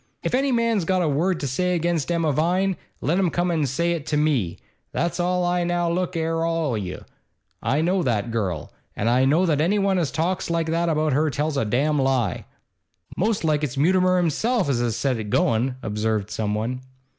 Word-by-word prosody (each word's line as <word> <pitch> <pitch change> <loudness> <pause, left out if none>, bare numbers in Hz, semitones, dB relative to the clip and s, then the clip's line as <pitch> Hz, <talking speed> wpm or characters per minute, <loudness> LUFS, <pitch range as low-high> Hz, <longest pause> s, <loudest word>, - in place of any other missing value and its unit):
'If - - -2
any 270 +2 +2
man's 230 -5 +1
got 185 +2 +1
a - - +1
word 165 +5 +1
to 140 - -1
say 180 +8 0
against 170 -2 0
Emma 165 -3 +1
Vine, 180 +6 +1 0.3
let 170 +5 +1
him 185 -3 +2
come 175 +1 0
an' 155 -4 +1
say 170 +7 0
it 160 -3 -3
to 150 - 0
me, 135 - +1 0.3
that's 170 +2 -1
all 180 0 +1
I 175 0 +1
Now 175 -1 0
look 180 0 -1
'ere, 165 0 0
all 165 -3 0
o' - - -1
you, 95 -4 -5 0.6
I 145 +3 +1
know 180 +3 +1
that 115 -6 -1
girl, 95 -8 -3 0.2
and 105 - -1
I 125 +2 +3
know 155 +7 +3
that 150 -4 +1
anyone 195 +2 +2
as 160 -5 0
talks 175 +5 -1
like 165 -1 0
that 170 +1 +1
about 155 -2 +1
her 150 +3 +2
tells 150 +2 -2
a 135 - 0
damned 140 +7 +1
lie.' 130 - 0 0.7
'Most 210 0 0
like 155 -2 +1
it's 140 -2 -3
Mutimer 185 +4 +3
himself 180 - +1
as 130 -4 +1
has 120 -3 0
set 135 -3 0
it 105 -1 -5
goin',' 120 +5 +1
observed 105 0 -1
someone. 110 +4 -2
160 Hz, 205 wpm, -23 LUFS, 130-175 Hz, 0.7 s, I